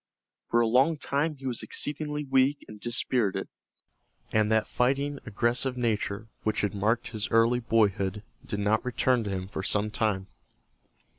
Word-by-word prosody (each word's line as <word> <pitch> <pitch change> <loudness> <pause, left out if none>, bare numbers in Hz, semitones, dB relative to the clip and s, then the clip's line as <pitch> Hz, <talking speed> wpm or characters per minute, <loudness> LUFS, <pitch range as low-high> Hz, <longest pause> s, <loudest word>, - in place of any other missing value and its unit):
For 120 - +3
a 115 - +3
long 135 +7 +3
time 145 +2 -1
he 135 -1 -12
was 125 -3 -2
exceedingly 150 0 -1
weak 135 +1 +2
and 105 -1 -11
dispirited, 120 -2 0 0.8
and 110 0 +2
that 110 -1 +3
fighting 140 +3 0
aggressive 120 +4 0
nature 110 -2 -1
which 110 0 0
had 100 -3 -1
marked 110 +4 0
his 110 +1 -4
early 115 +2 +4
boyhood 105 -4 +1 0.2
did 105 -5 -4
not 105 +2 +2
return 125 -1 +1
to - - -3
him 95 -1 -3
for 95 - -5
some 105 +2 +1
time. 105 -5 0
115 Hz, 155 wpm, -28 LUFS, 105-130 Hz, 0.8 s, early